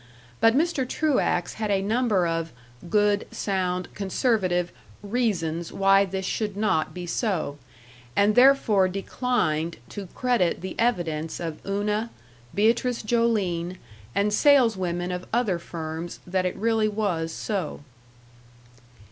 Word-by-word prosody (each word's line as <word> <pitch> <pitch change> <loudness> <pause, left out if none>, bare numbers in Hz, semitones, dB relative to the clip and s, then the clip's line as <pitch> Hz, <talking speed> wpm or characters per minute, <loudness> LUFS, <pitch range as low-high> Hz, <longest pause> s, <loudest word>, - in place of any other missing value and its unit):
But 225 +1 +5
Mr. 295 -5 +1
Truax 265 - +1
had 215 - 0
a 200 -1 +2
number 215 -3 +2
of 165 -1 -2 0.4
"good, 205 0 +2
sound, 185 -2 -1
conservative" 190 -4 0 0.3
reasons 185 -8 -1
why 195 0 +4
this 190 0 -4
should 210 0 -2
not 205 -7 +1
be 180 -1 -6
so, 175 - -2 0.6
and 205 +1 +4
therefore 245 -6 +5
declined 185 -5 -1
to 200 -2 -7
credit 245 -9 +1
the 185 0 -5
evidence 170 -9 0
of 165 -3 -5
Una, 210 +3 -1 0.5
Beatrice 230 +3 +2
Joline, 205 -6 0 0.4
and 205 +1 +2
saleswomen 190 -10 +3
of 180 0 -5
other 220 -7 +1
firms 165 0 -6
that 185 0 0
it 180 - -4
really 225 -1 +1
was 200 -7 -1
so. 190 -5 -3
195 Hz, 120 wpm, -25 LUFS, 175-225 Hz, 0.6 s, But